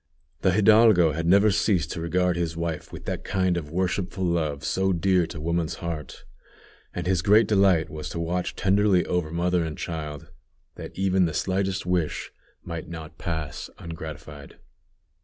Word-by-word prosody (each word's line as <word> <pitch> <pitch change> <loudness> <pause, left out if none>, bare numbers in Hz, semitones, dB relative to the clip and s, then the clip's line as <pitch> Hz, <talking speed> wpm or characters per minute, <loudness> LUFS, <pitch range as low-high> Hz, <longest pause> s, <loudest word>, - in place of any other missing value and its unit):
The 95 - +3
hidalgo 105 -4 +6
had 85 +3 -2
never 100 +4 +5
ceased 95 -5 +1
to 85 - -4
regard 90 +2 +1
his 85 -1 -2
wife 85 -2 -4
with - - -9
that - - -4
kind 95 -2 0
of 80 -4 -4
worshipful 95 +1 -1
love 80 -5 -1
so 95 +3 +1
dear 90 0 +2
to 80 - -8
woman's 85 0 -1
heart; 85 -3 -6 0.7
and 90 - -5
his 90 -2 +1
great 105 +5 +5
delight 95 -6 +3
was 75 0 -7
to 85 - -5
watch 85 +2 -2
tenderly 95 -2 +3
over 90 -3 -1
mother 85 +1 0
and 80 -2 -5
child, 75 -4 -6 0.4
that - - -10
even 95 -1 +2
the 80 - -3
slightest 95 0 -1
wish 90 -3 -1 0.3
might 85 -2 -6
not 80 -2 -9
pass 80 -5 -4
ungratified. 80 -3 -9
85 Hz, 160 wpm, -25 LUFS, 80-95 Hz, 0.7 s, hidalgo